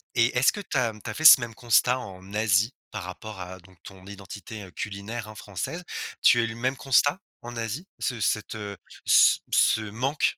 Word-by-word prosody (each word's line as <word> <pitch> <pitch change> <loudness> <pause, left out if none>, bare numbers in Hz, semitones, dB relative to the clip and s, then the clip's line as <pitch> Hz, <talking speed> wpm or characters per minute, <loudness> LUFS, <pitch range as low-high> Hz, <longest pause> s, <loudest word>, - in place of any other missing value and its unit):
et 120 +1 +2
est-ce 130 - +5
que 205 - -6
tu - - -4
as, 115 -3 +1
mmh, 105 - -15
tu - - -6
as - - -6
fait 155 - -5
ce 135 - +11
même 120 -1 -5
constat, 125 +2 +2
en 95 -2 -10
Asie, 110 +2 +2 0.2
par 100 -3 -5
rapport 95 +2 -8
à 90 +1 -8
donc 90 0 -20
ton 95 -1 -13
identité, 100 +2 -9
heu, 95 - -12
culinaire, 110 +4 -6
hein, 110 - -11
française? 105 - -6 0.4
Tu 120 - +6
as - - +3
eu - - 0
le 115 - -7
même 130 +3 -1
constat 140 +5 +2 0.2
en 120 0 -8
Asie, 115 - -4
ce 125 -3 -2
cette 110 +1 -1
heu, 100 -2 -6 0.3
ce - - +6
ce 110 - +4
manque? 125 +8 -3
110 Hz, 220 wpm, -26 LUFS, 100-125 Hz, 0.4 s, ce